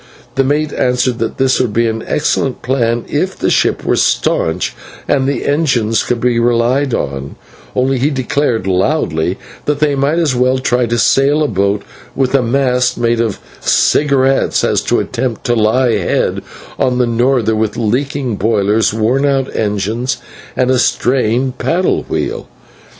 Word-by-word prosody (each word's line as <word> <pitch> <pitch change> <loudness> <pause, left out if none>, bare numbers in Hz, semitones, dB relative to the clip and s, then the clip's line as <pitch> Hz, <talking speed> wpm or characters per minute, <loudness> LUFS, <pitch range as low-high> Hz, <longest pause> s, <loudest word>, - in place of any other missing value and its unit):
The 135 - +2
mate 145 +2 0
answered 125 -1 0
that 115 0 -3
this 130 -1 +2
would 120 -5 -1
be 115 +2 +2
an 110 0 -2
excellent 140 -3 -1
plan 120 -3 0
if 185 +6 -2
the - - 0
ship - - +1
were - - +2
staunch - - 0 0.3
and 135 -1 +1
the 140 - -2
engines 135 -7 +1
to 125 - +1
be 120 0 0
relied 120 +3 +1
on, 70 0 -4 0.4
but 125 - +2
he 135 +1 +1
declared 130 -5 -1
loudly 95 - 0 0.3
that 145 -1 0
they 150 -1 +2
might 140 +4 0
as 160 -6 +1
well 125 +1 +2
try 125 -2 0
to 120 +1 -1
sail 140 +6 +3
a - - +1
boat 100 -2 0 0.3
with 135 -1 0
a 135 - +4
mast 125 0 +1
made 115 -1 +1
of 110 -4 -1 0.2
cigarettes, 135 -2 +2
as - - +1
to - - +1
attempt 125 -4 -3
to 120 - +1
lie 115 +3 +2
head 100 -4 0 0.4
on 125 -1 +1
to 125 - +3
a - - +2
norther 120 -1 +1
with 110 -1 -1
leaking 125 +1 -1
boilers, 105 0 +1
worn 120 +5 +1
out 135 -2 0
engines, 110 +4 -1 0.4
and 130 0 +2
a 130 - +2
strained 125 +1 0
paddle 180 +2 +1
wheel. - - -3
125 Hz, 165 wpm, -15 LUFS, 115-135 Hz, 0.4 s, a